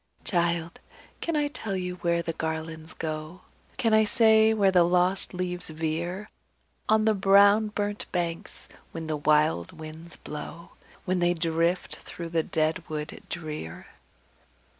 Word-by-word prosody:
"Child! 170 Hz, -2 st, 0 dB, 0.4 s
can 335 Hz, -, -2 dB
I 295 Hz, -1 st, +2 dB
tell 220 Hz, -9 st, -3 dB
where 180 Hz, -2 st, -1 dB
the 165 Hz, -, -3 dB
garlands 160 Hz, 0 st, -4 dB
go? 155 Hz, +2 st, -5 dB, 0.4 s
Can 225 Hz, -1 st, +2 dB
I 220 Hz, 0 st, +6 dB
say 220 Hz, 0 st, +5 dB
where 200 Hz, -3 st, +3 dB
the 180 Hz, -1 st, +5 dB
lost 180 Hz, +2 st, +2 dB
leaves 180 Hz, -1 st, -4 dB
veer 165 Hz, +5 st, -3 dB, 0.6 s
On 215 Hz, 0 st, +4 dB
the 220 Hz, -, +4 dB
brown 200 Hz, +2 st, +5 dB
burnt 205 Hz, 0 st, -3 dB
banks, 170 Hz, -2 st, -4 dB, 0.3 s
when 165 Hz, -1 st, -5 dB
the 155 Hz, -1 st, -2 dB
wild 150 Hz, -, +2 dB
winds 160 Hz, +2 st, -9 dB
blow, 150 Hz, +3 st, -8 dB, 0.3 s
When 185 Hz, 0 st, 0 dB
they 175 Hz, 0 st, +2 dB
drift 165 Hz, +2 st, 0 dB
through 170 Hz, -1 st, -8 dB
the 165 Hz, -1 st, +1 dB
dead 160 Hz, +2 st, 0 dB
wood 150 Hz, 0 st, -5 dB
drear? 150 Hz, -, -6 dB
170 Hz, 140 wpm, -27 LUFS, 160-195 Hz, 0.6 s, I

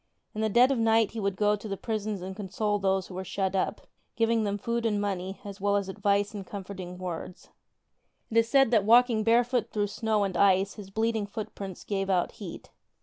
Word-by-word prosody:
In 215 Hz, -, -3 dB
the 220 Hz, -, +1 dB
dead 245 Hz, +5 st, +5 dB
of 265 Hz, -, 0 dB
night 225 Hz, -1 st, +3 dB
he 225 Hz, -, -5 dB
would 200 Hz, -2 st, -1 dB
go 210 Hz, +1 st, +2 dB
to 210 Hz, +1 st, -8 dB
the 195 Hz, -1 st, -3 dB
prisons 215 Hz, -3 st, -3 dB
and 190 Hz, +1 st, -6 dB
console 205 Hz, +1 st, -1 dB
those 190 Hz, -1 st, +1 dB
who -, -, -11 dB
were 185 Hz, +1 st, -4 dB
shut 190 Hz, 0 st, -2 dB
up, 190 Hz, -, -1 dB, 0.3 s
giving 225 Hz, -1 st, +2 dB
them 200 Hz, 0 st, -1 dB
food 235 Hz, +3 st, -2 dB
and 215 Hz, -3 st, +1 dB
money 195 Hz, -2 st, -3 dB
as 200 Hz, -1 st, -8 dB
well 200 Hz, 0 st, +2 dB
as 200 Hz, -1 st, 0 dB
advice 200 Hz, +1 st, 0 dB
and 205 Hz, -2 st, -5 dB
comfort 195 Hz, 0 st, -8 dB
ing 180 Hz, 0 st, -7 dB
words. 180 Hz, -1 st, -6 dB, 0.8 s
It 225 Hz, -, 0 dB
is 230 Hz, 0 st, +4 dB
said 270 Hz, -3 st, +4 dB
that 220 Hz, -4 st, +4 dB
walking 230 Hz, 0 st, +5 dB
barefoot 235 Hz, +1 st, +2 dB
through 210 Hz, -1 st, 0 dB
snow 215 Hz, 0 st, 0 dB
and 195 Hz, -2 st, -2 dB
ice 195 Hz, +1 st, +3 dB
his 205 Hz, -3 st, -10 dB
bleeding 220 Hz, 0 st, 0 dB
footprints 200 Hz, -2 st, -7 dB
gave 195 Hz, -1 st, -2 dB
out 180 Hz, -2 st, +1 dB
heat. 200 Hz, -7 st, -9 dB
205 Hz, 215 wpm, -28 LUFS, 195-225 Hz, 0.8 s, dead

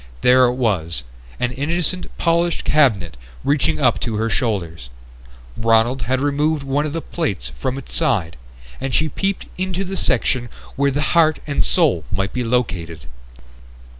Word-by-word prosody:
There 125 Hz, +1 st, +6 dB
it 125 Hz, 0 st, +1 dB
was: 85 Hz, -, -1 dB, 0.4 s
an 125 Hz, -1 st, 0 dB
innocent 170 Hz, +7 st, -2 dB
polished 170 Hz, 0 st, +1 dB
cabinet 100 Hz, -, +2 dB, 0.3 s
reaching 130 Hz, -, +1 dB
up -, -, +3 dB
to 115 Hz, -, -2 dB
her 110 Hz, +1 st, 0 dB
shoulders. 85 Hz, -, -2 dB, 0.7 s
Ronald 115 Hz, +3 st, +2 dB
had 130 Hz, 0 st, +2 dB
removed 145 Hz, +1 st, +1 dB
one 140 Hz, +2 st, 0 dB
of 145 Hz, -, -5 dB
the 165 Hz, -, -3 dB
plates 95 Hz, -, -3 dB
from 130 Hz, -, -2 dB
its 135 Hz, -, -8 dB
side 85 Hz, -6 st, +1 dB, 0.4 s
and 135 Hz, -1 st, -2 dB
she 160 Hz, 0 st, +2 dB
peeped 195 Hz, +6 st, -2 dB
into 185 Hz, 0 st, -1 dB
the 195 Hz, +1 st, -5 dB
section 125 Hz, -9 st, 0 dB, 0.3 s
where 140 Hz, 0 st, +2 dB
the 145 Hz, +2 st, -1 dB
heart 160 Hz, -2 st, +4 dB
and 145 Hz, -2 st, +1 dB
soul 145 Hz, -, +2 dB
might 95 Hz, -1 st, -1 dB
be 125 Hz, -, -1 dB
located. 90 Hz, -, -2 dB
130 Hz, 155 wpm, -20 LUFS, 105-155 Hz, 0.7 s, There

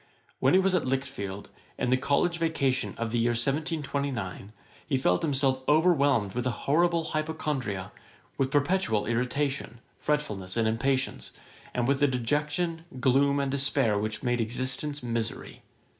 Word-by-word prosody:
While -, -, +3 dB
he -, -, +7 dB
was 190 Hz, 0 st, +2 dB
at 175 Hz, -7 st, +1 dB
Lichfield, 115 Hz, -7 st, -3 dB, 0.3 s
in 125 Hz, -, 0 dB
the -, -, +6 dB
college 145 Hz, +6 st, +1 dB
vacation 140 Hz, -6 st, 0 dB
of 115 Hz, -1 st, -2 dB
the 120 Hz, -, +1 dB
year 120 Hz, +1 st, +2 dB
1729, 140 Hz, -, -2 dB, 0.4 s
he 140 Hz, -4 st, +1 dB
felt 90 Hz, -8 st, +2 dB
himself 135 Hz, -3 st, +1 dB
overwhelmed 145 Hz, -, +3 dB
with 125 Hz, +1 st, -1 dB
an 125 Hz, -, 0 dB
horrible 170 Hz, +5 st, +2 dB
hypochondria, 150 Hz, -10 st, -2 dB, 0.4 s
with 135 Hz, -1 st, 0 dB
perpetual 145 Hz, -, +1 dB
irritation, 125 Hz, +1 st, -1 dB, 0.2 s
fretfulness, 105 Hz, -11 st, -2 dB
and 115 Hz, -1 st, +2 dB
impatience; 130 Hz, +4 st, 0 dB, 0.4 s
and 120 Hz, -1 st, -1 dB
with 140 Hz, +1 st, +1 dB
a 145 Hz, -, +6 dB
dejection, 150 Hz, +6 st, -1 dB
gloom, 140 Hz, +2 st, +3 dB
and 140 Hz, -1 st, 0 dB
despair, 135 Hz, -5 st, +2 dB
which 110 Hz, +3 st, -2 dB
made 120 Hz, -1 st, +1 dB
existence 130 Hz, +5 st, -2 dB
misery. 115 Hz, -2 st, -3 dB
135 Hz, 145 wpm, -28 LUFS, 115-150 Hz, 0.4 s, he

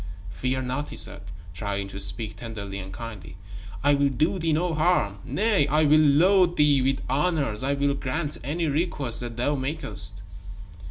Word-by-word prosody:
"Fear 130 Hz, +4 st, -2 dB
not," 130 Hz, +4 st, -3 dB
he -, -, -8 dB
said, -, -, +5 dB, 0.3 s
trying 100 Hz, +2 st, -3 dB
to 95 Hz, -, -8 dB
speak 100 Hz, +3 st, -1 dB
tenderly 100 Hz, -4 st, -7 dB
and 95 Hz, 0 st, -8 dB
kindly. 110 Hz, -4 st, -9 dB, 0.5 s
"I 145 Hz, 0 st, +4 dB
will 140 Hz, 0 st, +2 dB
do 155 Hz, +7 st, 0 dB
thee 165 Hz, -1 st, 0 dB
no 165 Hz, +2 st, 0 dB
harm. 155 Hz, -, +1 dB
Nay, 165 Hz, -, +1 dB
I 150 Hz, +2 st, +2 dB
will 155 Hz, +1 st, +5 dB
load 175 Hz, +5 st, +4 dB
thee 145 Hz, -2 st, +4 dB
with 135 Hz, +1 st, 0 dB
honors. 140 Hz, -5 st, 0 dB
I 135 Hz, +2 st, 0 dB
will 140 Hz, 0 st, 0 dB
grant 145 Hz, +3 st, -3 dB
any 160 Hz, +6 st, -2 dB
request 145 Hz, -5 st, -2 dB
that 120 Hz, -1 st, -6 dB
thou 130 Hz, +5 st, 0 dB
makest." 105 Hz, -, -1 dB
140 Hz, 170 wpm, -25 LUFS, 115-155 Hz, 0.5 s, said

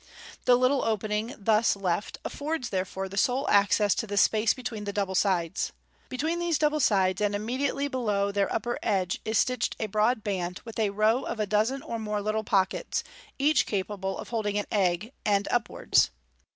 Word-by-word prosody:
The 250 Hz, -, +6 dB
little 255 Hz, +2 st, +2 dB
opening 215 Hz, +2 st, -1 dB
thus 215 Hz, +1 st, +3 dB
left 195 Hz, 0 st, -2 dB
affords 295 Hz, -3 st, -3 dB
therefore 190 Hz, 0 st, -2 dB
the 195 Hz, +1 st, -8 dB
sole 255 Hz, +6 st, +1 dB
access 205 Hz, 0 st, +4 dB
to 225 Hz, -, -3 dB
the 205 Hz, 0 st, -3 dB
space 215 Hz, +2 st, +4 dB
between 220 Hz, -4 st, -5 dB
the 200 Hz, -, -2 dB
double 200 Hz, -2 st, -1 dB
sides. 185 Hz, -3 st, 0 dB, 0.4 s
Between 315 Hz, +7 st, -1 dB
these 345 Hz, -3 st, +1 dB
double 305 Hz, 0 st, +1 dB
sides, 190 Hz, -6 st, +2 dB
and 205 Hz, -1 st, +1 dB
immediately 260 Hz, +6 st, -1 dB
below 210 Hz, -7 st, 0 dB
their 200 Hz, -1 st, 0 dB
upper 240 Hz, +1 st, -2 dB
edge, 190 Hz, -4 st, 0 dB
is 220 Hz, 0 st, 0 dB
stitched 250 Hz, +1 st, +1 dB
a -, -, -1 dB
broad 215 Hz, +2 st, +1 dB
band, 180 Hz, -3 st, -2 dB
with 225 Hz, -1 st, -7 dB
a 215 Hz, -2 st, +2 dB
row 215 Hz, +5 st, +2 dB
of -, -, -4 dB
a 215 Hz, -, +1 dB
dozen 215 Hz, +7 st, 0 dB
or 235 Hz, -8 st, -4 dB
more 210 Hz, -1 st, -2 dB
little 215 Hz, +1 st, -1 dB
pockets, 195 Hz, -, 0 dB, 0.3 s
each 280 Hz, -3 st, +3 dB
capable 195 Hz, -1 st, -3 dB
of -, -, -8 dB
holding 210 Hz, -3 st, -1 dB
an 205 Hz, -, -1 dB
egg, 195 Hz, +3 st, 0 dB
end 200 Hz, -1 st, +1 dB
up 240 Hz, -2 st, +1 dB
wards. -, -, +2 dB
215 Hz, 185 wpm, -27 LUFS, 200-245 Hz, 0.4 s, The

